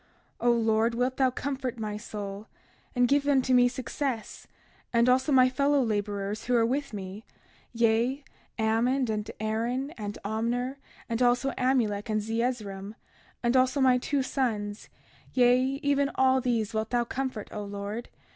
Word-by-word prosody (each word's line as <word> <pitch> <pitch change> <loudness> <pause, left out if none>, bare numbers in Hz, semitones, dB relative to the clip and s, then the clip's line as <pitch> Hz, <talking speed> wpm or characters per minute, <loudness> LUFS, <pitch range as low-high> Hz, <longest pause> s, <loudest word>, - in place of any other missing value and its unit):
31:32 245 - -1
O - - +7
Lord, 225 0 +2
wilt 250 +2 0
thou 265 -1 +4
comfort 260 -1 -3
my 215 -2 -3
soul, 205 -1 -6 0.5
and 245 0 +4
give 280 +2 +2
unto 265 -2 +3
me 245 0 +6
success, 250 -1 -4 0.4
and 235 0 +3
also 260 +3 +3
my 255 -2 +6
fellow 280 +3 +2
laborers 205 -3 -2
who 250 - +1
are 230 -1 +4
with 275 +4 -1
me—yea, 225 +5 -2 0.3
Ammon, 230 +3 +1
and 210 -1 -3
Aaron, 235 +6 -1
and 205 -1 -5
Omner, 240 +5 -1 0.3
and 230 0 -2
also 245 +2 +3
Amulek 235 -6 0
and 215 0 +1
Zeezrom 215 -3 -3 0.5
and 240 +1 +2
also 260 +2 +3
my 255 -2 +4
two 275 +2 0
sons—yea, 245 +1 -1 0.2
even 280 -1 +2
all 260 0 +4
these 230 -4 0
wilt 220 0 -1
thou 240 -1 +1
comfort, 255 -3 -4
O 210 - -5
Lord. 205 +3 -5
240 Hz, 145 wpm, -28 LUFS, 220-260 Hz, 0.5 s, O